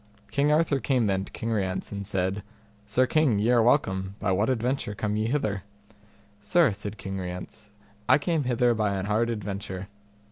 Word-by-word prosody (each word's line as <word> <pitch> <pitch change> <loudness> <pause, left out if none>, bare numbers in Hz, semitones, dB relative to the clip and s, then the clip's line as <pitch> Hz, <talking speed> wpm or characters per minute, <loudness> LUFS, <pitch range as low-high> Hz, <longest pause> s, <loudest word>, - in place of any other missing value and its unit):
King 140 +5 +2
Arthur 150 -2 +3
came 130 -3 +1
then 95 -1 0
to - - -14
King 115 0 -4
Rience, 95 -4 -2
and 100 -1 -5
said, 95 0 -1 0.5
Sir 125 +5 +3
king, 135 -4 +2
ye 110 +4 +2
are 120 -1 +5
welcome: 95 -6 +1
by 95 - 0
what 100 +5 +2
adventure 125 -3 -1
come 105 0 -1
ye 110 +1 0
hither? 110 -7 -1 0.8
Sir, 125 +4 +3
said 100 +1 -7
King 95 0 -5
Rience, 90 +3 -7 0.4
I - - +7
came 155 -1 0
hither 120 -1 +3
by 105 -3 0
an 95 -1 -2
hard 110 +3 +1
adventure. 100 -3 -5
105 Hz, 180 wpm, -27 LUFS, 100-125 Hz, 0.8 s, I